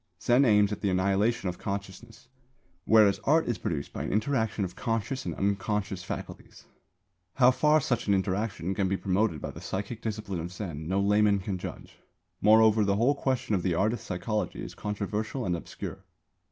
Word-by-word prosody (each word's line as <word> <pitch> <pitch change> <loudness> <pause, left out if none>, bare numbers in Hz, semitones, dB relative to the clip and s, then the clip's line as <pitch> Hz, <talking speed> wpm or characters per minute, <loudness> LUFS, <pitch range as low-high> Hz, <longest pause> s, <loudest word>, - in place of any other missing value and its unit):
Zen 125 +5 +4
aims 105 -3 +4
at 105 - -4
the 100 - +1
annihilation 100 +4 +1
of 90 - -4
consciousness, 100 +5 -6 0.6
whereas 105 -3 +5
art 160 +3 +3
is 120 -3 -1
produced 75 -4 -3
by - - -4
an - - -3
interaction 110 -2 0
of 90 - -8
conscious 115 +3 -2
and - - -3
unconscious 100 -1 -1
faculties. - - -8 0.7
How 130 -2 +6
far 150 +4 +3
such 120 -6 -1
an 100 - +4
interaction 95 -1 -1
can 95 0 0
be 95 +1 0
promoted 95 -5 0
by - - -4
the - - -11
psychic 105 +4 -4
discipline 105 -4 -4
of 85 +2 -5
Zen 85 -6 -6
no 95 +3 +1
layman 105 +1 +3
can 95 -1 -4
judge; - - -9 0.4
moreover 110 0 +6
the 100 -1 +2
whole 120 +7 +3
question 130 -5 -1
of 95 - +2
the 90 -2 0
artist's 110 +5 0
psychology 105 +1 -3
is - - -7
controversial 105 +4 -3
and 90 - 0
obscure. 85 - -7
105 Hz, 180 wpm, -28 LUFS, 95-115 Hz, 0.7 s, How